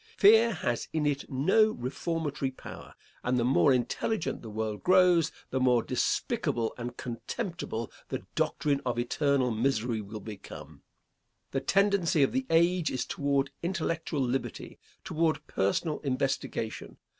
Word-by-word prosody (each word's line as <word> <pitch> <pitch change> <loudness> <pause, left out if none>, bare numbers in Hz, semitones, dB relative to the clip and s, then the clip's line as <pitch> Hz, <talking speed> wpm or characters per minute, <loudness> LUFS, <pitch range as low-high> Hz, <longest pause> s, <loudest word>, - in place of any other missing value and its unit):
Fear 225 +3 +7
has 120 -8 -2
in 155 -2 0
it 140 -1 -1
no 190 +12 +4
reformatory 145 +2 -2
power, 130 - -11 0.3
and 125 +1 +1
the 120 - +2
more 135 +3 +4
intelligent 130 - -1
the 115 - -8
world 110 -1 -3
grows 180 -3 +4 0.2
the 130 - 0
more 125 -2 +3
despicable 115 -2 0
and 120 0 -6
contemptible 125 - -4 0.2
the - - -4
doctrine 140 -2 0
of 125 -2 -2
eternal 130 +1 +1
misery 115 -1 0
will 105 +1 -7
become. 105 -2 -10 0.7
The 135 - -1
tendency 190 -2 +3
of - - +2
the 265 +1 -1
age 170 +1 +3
is 130 - -2
toward 140 -1 0
intellectual 165 -4 -2
liberty, 130 +1 -3 0.2
toward 160 0 0
personal 125 - 0
investigation. 130 -4 -2
140 Hz, 135 wpm, -29 LUFS, 120-165 Hz, 0.7 s, Fear